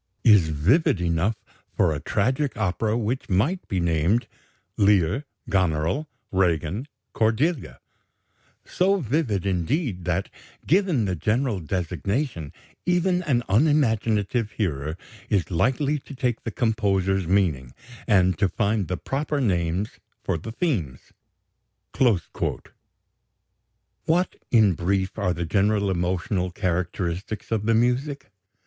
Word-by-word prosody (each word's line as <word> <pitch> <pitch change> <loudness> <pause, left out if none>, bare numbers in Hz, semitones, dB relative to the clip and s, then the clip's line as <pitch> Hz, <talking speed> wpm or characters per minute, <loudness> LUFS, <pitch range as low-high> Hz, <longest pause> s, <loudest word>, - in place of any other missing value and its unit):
is 105 -9 +6
vivid 90 - +2
enough 85 +5 +1 0.4
for - - +3
a 75 - -3
tragic 130 - 0
opera 105 +2 0
which 120 +3 -2
might 125 - +1
be 95 - -1
named 85 +7 +1 0.5
'Lear, 100 - +3 0.2
Goneril, 95 - 0 0.2
Regan, 90 - 0 0.3
Cordelia'; 115 - 0 0.9
so 195 +2 +2
vivid, 125 - -1
indeed, 95 - -1
that, 90 +2 -1 0.3
given 175 - +2
the 95 -2 -1
general 110 - 0
designation, 90 - -2 0.3
even 180 0 +2
an 125 -6 +1
unimaginative 115 -4 +2
hearer 80 -6 -2 0.3
is 100 -3 0
likely 135 - +1
to 140 - -11
take 125 -3 -1
the - - -1
composer's 95 -5 +1
meaning, 80 -10 +1 0.4
and 95 -3 +3
to 100 -2 +3
find 105 -2 0
the 90 - -2
proper 145 +2 -2
names 90 -3 -1 0.2
for - - 0
the 80 +8 -6
themes." 110 - -2 2.9
What, 175 +3 +1
in 110 -5 +5
brief, 95 +4 -1
are 90 -4 +1
the 85 - -3
general 100 +2 +1
emotional 90 +1 -1
characteristics 90 +2 -3
of 110 -1 0
the 115 - +4
music? 135 +3 0
100 Hz, 115 wpm, -24 LUFS, 90-125 Hz, 2.9 s, is